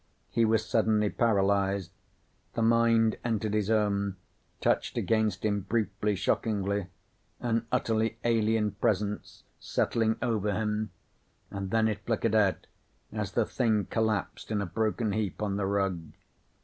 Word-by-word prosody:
He 115 0 +3
was 110 0 +2
suddenly 110 -2 +2
paralyzed. 100 -4 +1 0.6
The 115 - +1
mind 115 -1 +4
entered 110 -3 -1
his 105 -1 0
own, 100 -3 +1 0.4
touched - - 0
against 110 -3 +1
him 105 -1 +1
briefly, 105 0 -1
shockingly. 100 -1 0 0.5
An 115 -1 -1
utterly 110 -2 +1
alien 110 -2 +2
presence, 105 +1 -2 0.2
settling 110 -1 0
over 105 -3 0
him 105 0 -1 0.6
and 100 -1 -4
then 110 +1 +3
it 105 -2 -3
flickered 115 -1 0
out 105 -4 +2 0.5
as - - -3
the - - +2
thing 110 -4 +1
collapsed 110 -3 -1
in 105 -2 0
a 100 - -1
broken 110 +4 -1
heap 105 -3 -2
on 100 -2 -1
the 100 -1 0
rug. 95 -3 0
105 Hz, 135 wpm, -29 LUFS, 100-110 Hz, 0.6 s, mind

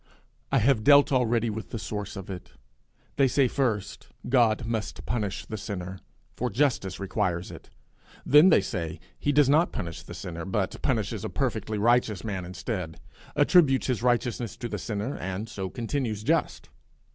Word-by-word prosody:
I 135 - +4
have 120 -2 +3
dealt 145 +2 +6
already 120 -3 +2
with 110 +1 -6
the 120 - -4
source 105 -1 -5
of 95 -2 -7
it. 90 -8 -8 0.6
They 135 - +5
say 135 +1 +3
first, 115 -6 -2 0.2
God 120 -2 +3
must 115 -2 -3
punish 105 -5 -2
the 110 - -5
sinner, 95 -3 -6 0.4
for 125 - -1
justice 115 -6 0
requires 95 -3 -1
it; - - -12 0.6
then 150 +6 +7
they 165 - +5
say 85 -4 -4 0.2
he 145 - +1
does 145 -1 +5
not 155 +5 +4
punish 85 -1 -5
the 85 +1 -10
sinner, 85 -3 -6
but 95 - -2
punishes - - -1
a - - -3
perfectly 110 - -2
righteous 115 -2 +2
man 95 -5 -3
instead, 90 -3 -5 0.4
attributes 145 -2 +4
his 125 -4 -1
righteousness 120 -2 0
to 120 - -4
the - - -4
sinner, 110 +5 -3
and 95 +4 -4
so 95 -4 -5
continues 115 -3 -3
just. - - 0
110 Hz, 165 wpm, -27 LUFS, 95-130 Hz, 0.6 s, then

